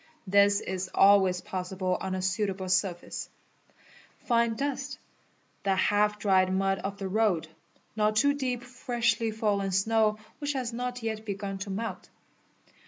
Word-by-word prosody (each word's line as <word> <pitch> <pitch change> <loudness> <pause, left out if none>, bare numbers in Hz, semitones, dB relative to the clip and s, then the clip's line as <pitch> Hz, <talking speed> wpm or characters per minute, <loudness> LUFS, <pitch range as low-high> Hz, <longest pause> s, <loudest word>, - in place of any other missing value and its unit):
This 200 +1 +4
is 185 0 -4
always 190 -2 +5
possibl 185 0 -2
on 190 0 -2
a 185 - -3
suitable 190 0 -1
surface; 185 -1 -1 1.0
fine 235 -2 +2
dust, 275 0 -3 0.6
the 195 -1 +1
half 210 +2 +2
dried 190 -3 +3
mud 195 0 +1
of 200 0 -4
the 195 -1 -4
road, 190 -5 +1 0.5
not 215 0 +2
too 285 +6 +4
dee} 260 -3 -1
freshly 240 -2 -1
fallen 205 -3 0
snow 215 +2 +2 0.2
which 290 -1 -2
has 250 -3 -3
not 245 0 -4
yet 220 -1 -3
begun 200 -2 -4
to 200 +1 -5
melt. 220 +4 -4
205 Hz, 140 wpm, -28 LUFS, 190-230 Hz, 1.0 s, always